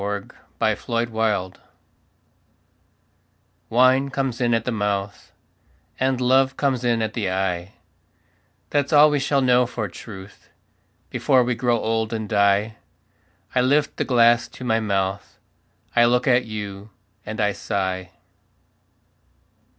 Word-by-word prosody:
A 100 0 -3 0.5
DRINKING 115 0 -3
SONG 105 -4 0 2.2
Wine 130 +3 +3
comes 135 -3 -3
in 120 -1 +2
at 115 - -2
the 125 - -1
mouth 100 -2 -3 0.7
And 130 -1 +1
love 130 +1 +2
comes 135 -3 0
in 115 -2 +1
at 110 0 -3
the 105 -5 -2
eye; 95 -1 -2 1.0
That's 145 0 0
all 150 0 +6
we 145 - +1
shall 140 0 +1
know 125 -1 +3
for 115 -3 -4
truth 95 +1 -12 0.6
Before 130 -2 +3
we 125 +1 0
grow 120 0 +1
old 110 0 -1
and 110 -1 -3
die. 100 +1 +2 0.8
I 125 - +3
lift 140 +3 +1
the - - 0
glass 120 -2 +3
to - - -12
my 115 -2 +1
mouth, 100 -2 -2 0.6
I 120 0 +6
look 125 +1 +1
at 125 -1 +3
you, 105 -2 -7 0.3
and 110 0 -7
I 105 -1 +2
sigh. 95 -3 -3
115 Hz, 130 wpm, -22 LUFS, 100-125 Hz, 2.2 s, all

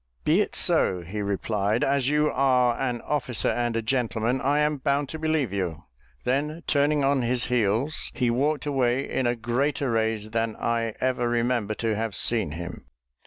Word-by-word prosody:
"Be - - +3
it - - -3
so," 90 -1 +3
he 95 +5 -5
replied; 100 +2 -1
"as 135 -1 +1
you 150 +1 +2
are 125 -3 +3
an 125 -3 -1
officer 130 -6 0
and 120 -1 -1
a 115 - -1
gentleman, 120 0 0
I 140 +2 +2
am 150 0 +1
bound 140 +1 0
to 160 - -6
believe 155 -9 0
you." 85 -5 -3 0.4
Then 150 +6 -1
turning 145 0 +2
on 135 -1 +2
his 120 +1 +1
heels, 120 +5 +1
he 125 -3 +1
walked 145 +4 0
away 135 -2 +1
in 130 - -1
a 120 - +1
greater 125 +3 -1
rage 110 -1 -1
than 115 0 -1
I 115 -1 -1
ever 125 -2 0
remember 120 -3 0
to 110 -1 -1
have 110 -2 -3
seen 110 -11 0
him. 85 -4 -7
120 Hz, 175 wpm, -25 LUFS, 110-140 Hz, 0.4 s, Be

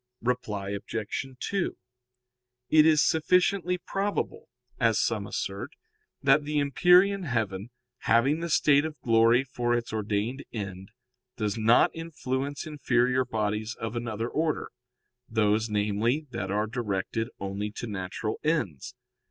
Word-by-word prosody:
Reply 105 -5 -2
Obj. 105 +4 -3
2: 195 -3 -2 0.9
It 155 -1 +7
is 155 -2 +5
sufficiently 180 +3 +2
probable, 205 - -3 0.3
as - - +3
some - - 0
assert, - - -4 0.5
that 140 +2 +5
the 150 +1 -2
empyrean 180 +7 +4
heaven, 110 - -2 0.3
having 130 +7 +3
the 170 0 -3
state 145 -2 +4
of 155 -3 -5
glory 115 +2 +4
for 120 -2 -1
its 115 -2 -3
ordained 110 +5 -2
end, 95 -3 -6 0.5
does 105 -3 -1
not 115 +1 +4
influence 140 -4 -4
inferior 130 -4 +1
bodies 110 -1 -2
of 115 +1 -4
another 115 -1 -3
order 155 +3 -1 0.6
those, 110 0 +2
namely, 105 +7 0
that 95 -5 -4
are 105 +2 +1
directed 110 -1 -2
only 100 +2 -3
to 120 - -5
natural 100 0 -4
ends. 150 - -1
120 Hz, 125 wpm, -27 LUFS, 105-150 Hz, 0.9 s, It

